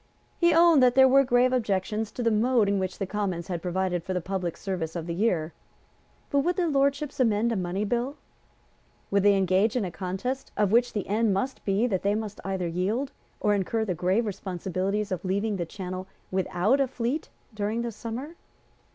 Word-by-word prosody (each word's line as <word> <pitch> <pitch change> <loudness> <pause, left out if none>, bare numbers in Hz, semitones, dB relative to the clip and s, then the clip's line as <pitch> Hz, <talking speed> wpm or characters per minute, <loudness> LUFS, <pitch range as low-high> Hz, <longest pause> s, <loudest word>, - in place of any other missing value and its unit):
He 345 -1 +5
owned 330 -3 +6
that 250 -1 +5
there 265 0 +8
were 275 +1 +6
grave 250 0 +3
objections 215 -2 -1
to 245 - -3
the 230 - +3
mode 225 0 +3
in 200 0 +1
which 185 -1 -3
the 195 - -2
Commons 190 -4 -3
had 175 -2 -3
provided 180 -1 -1
for 185 +1 -3
the - - +1
public 180 -1 -3
service 180 -4 -4
of 165 -2 -3
the 170 - -3
year. 175 -5 0 0.8
But 280 - +3
would 345 +6 +1
their 360 -3 +1
Lordships 280 +1 0
amend 230 -1 +2
a - - 0
money 185 +2 -2
bill? 245 +6 -1 0.9
Would 200 0 +3
they 200 0 +5
engage 195 +4 +2
in 240 -5 +1
a 180 - -4
contest 195 +10 -4
of 205 -2 +2
which 240 +2 +3
the 205 - -2
end 210 0 +2
must 255 +8 -3
be 200 +4 +2
that 195 -7 0
they 200 +1 +1
must 215 -1 -4
either 190 -2 -2
yield, 200 +11 -1 0.3
or 210 - +2
incur 215 +3 0
the 190 - -1
grave 185 +7 +1
responsibility 190 0 -2
of 195 -4 -4
leaving 200 +2 -1
the 170 -2 -3
Channel 185 0 -6 0.2
without 190 +6 +1
a 270 - +2
fleet 255 +4 -3 0.2
during 215 +2 -2
the 235 - -3
summer? 235 +9 -6
205 Hz, 200 wpm, -27 LUFS, 185-245 Hz, 0.9 s, there